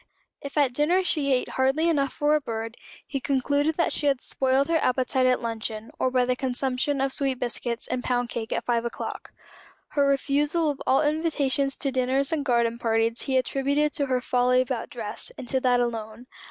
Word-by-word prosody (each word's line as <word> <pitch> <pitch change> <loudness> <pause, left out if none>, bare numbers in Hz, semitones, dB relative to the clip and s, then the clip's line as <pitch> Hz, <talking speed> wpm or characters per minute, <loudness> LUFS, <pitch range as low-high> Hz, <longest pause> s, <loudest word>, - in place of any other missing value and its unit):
If 280 +1 -7
at 275 -4 +3
dinner 335 +8 +2
she 295 -6 +2
ate 255 -1 +1
hardly 270 +5 +1
enough 280 -5 +1
for 295 +1 +1
a 305 - +2
bird, 225 -2 -5 0.3
he 275 - -3
concluded 285 +3 0
that 340 - +1
she 295 - 0
had 275 -2 +2
spoiled 265 +2 0
her 330 0 +2
appetite 255 0 +1
at 255 -1 +1
luncheon, 225 -1 -4
or 260 - +2
by 255 -1 +2
the 250 0 +1
consumption 260 +2 -1
of 270 0 +1
sweet 270 -2 0
biscuits 240 -1 -2
and 255 -1 -2
pound 245 -1 0
cake 225 -1 -5
at - - -1
five 235 -1 +1
o'clock. 235 - -6 0.6
Her 285 -1 +2
refusal 295 +3 +1
of 280 - -9
all 265 - +4
invitations 295 -3 0
to 275 - -1
dinners 265 +3 0
and 300 -3 0
garden 235 -3 +1
parties 230 0 +1
he 265 -2 0
attributed 280 +3 +1
to 280 - -1
her 255 -1 0
folly 250 0 +2
about 255 -2 -2
dress, 220 -4 -4
and 245 - -8
to 265 - +1
that 250 -1 +2
alone. 230 -1 -3
260 Hz, 195 wpm, -25 LUFS, 245-285 Hz, 0.6 s, all